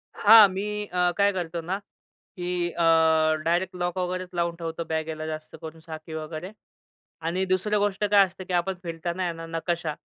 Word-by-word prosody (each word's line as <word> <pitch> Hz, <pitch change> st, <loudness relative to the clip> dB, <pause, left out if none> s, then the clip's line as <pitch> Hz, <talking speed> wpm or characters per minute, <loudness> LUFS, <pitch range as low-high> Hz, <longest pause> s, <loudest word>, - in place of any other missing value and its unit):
हां, 215 Hz, 0 st, +8 dB
मी 210 Hz, +2 st, -3 dB
अ, 180 Hz, 0 st, +1 dB
काय 200 Hz, 0 st, +4 dB
करतो 170 Hz, -2 st, -3 dB
ना 185 Hz, +4 st, -2 dB, 0.6 s
की 175 Hz, -1 st, -1 dB
अ, -, -, -10 dB, 0.7 s
डायरेक्ट 180 Hz, +2 st, 0 dB
लॉक 175 Hz, 0 st, -2 dB
वगैरेच 185 Hz, 0 st, -2 dB
लावून 170 Hz, 0 st, 0 dB
ठेवतो 165 Hz, 0 st, -5 dB
बॅगेला, 160 Hz, 0 st, -3 dB
जास्त 155 Hz, 0 st, -7 dB
करून 160 Hz, 0 st, -9 dB
साखळी 160 Hz, 0 st, -9 dB
वगैरे. 160 Hz, +4 st, -6 dB, 0.7 s
आणि 175 Hz, +4 st, -1 dB
दुसरी 185 Hz, +3 st, +1 dB
गोष्ट 205 Hz, 0 st, 0 dB
काय 200 Hz, -1 st, +6 dB
असते 185 Hz, 0 st, -11 dB
की 185 Hz, -, -6 dB
आपण 180 Hz, +2 st, +1 dB
फिरताना 170 Hz, +2 st, -4 dB
आहे 175 Hz, -2 st, -1 dB
ना, 165 Hz, 0 st, -8 dB
नकाशा. 165 Hz, -1 st, -2 dB
175 Hz, 175 wpm, -26 LUFS, 165-190 Hz, 0.7 s, हां